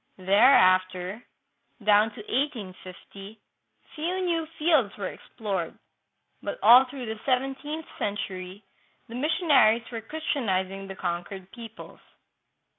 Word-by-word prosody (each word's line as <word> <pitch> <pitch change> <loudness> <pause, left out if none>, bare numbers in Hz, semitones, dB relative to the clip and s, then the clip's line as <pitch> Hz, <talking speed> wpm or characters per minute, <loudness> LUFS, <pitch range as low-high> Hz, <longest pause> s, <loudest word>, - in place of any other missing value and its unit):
Thereafter, 185 -1 +4 0.6
down 210 +1 +5
to - - -8
1850, 205 -4 -5 0.5
few 355 +4 -2
new 330 -2 -1
fields 300 -10 +2
were 195 -2 -3
explored, 205 -4 -5 0.6
but - - -4
all 250 +3 +9
through 260 -2 -7
the 220 -1 -5
seven 270 +1 +1
teenth 305 +2 -5
century 195 -1 -4 0.5
the - - -9
missionaries 265 -5 +3
were 230 -1 -5
Christianizing 195 -9 -2
the 195 - -7
conquered 180 +1 -5
peoples. 230 -2 -11
220 Hz, 110 wpm, -26 LUFS, 195-275 Hz, 0.6 s, all